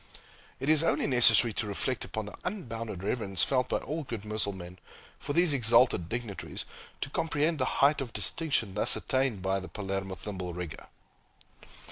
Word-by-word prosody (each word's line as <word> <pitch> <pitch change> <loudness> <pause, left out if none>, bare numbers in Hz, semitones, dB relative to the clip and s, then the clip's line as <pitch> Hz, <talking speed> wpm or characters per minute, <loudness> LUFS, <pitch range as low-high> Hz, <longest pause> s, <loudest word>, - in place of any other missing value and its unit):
It 135 - -4
is 155 0 +5
only 165 - +2
necessary 120 -3 +5
to 105 - -2
reflect 110 +5 -1
upon 110 -1 -4
the 105 - -8
unbounded 115 - -4
reverence 100 -3 0
felt 130 -2 +1
by - - +2
all 155 +4 -4
good 115 -6 -6
Mussulmen 100 -4 -3 0.4
for 145 - -3
these 170 -2 +4
exalted 115 -8 +4
dignitaries, 115 -4 -4 0.4
to - - -3
comprehend 155 0 0
the 130 - +2 0.2
height 145 0 +3
of 125 -4 -5
distinction 135 - -1
thus 105 - +1
attained 130 -7 0
by 95 0 +1
the 95 - -8
Palermo 95 0 -3
thimble 90 -3 -5
rigger. 90 -3 -6
115 Hz, 160 wpm, -30 LUFS, 95-135 Hz, 0.4 s, is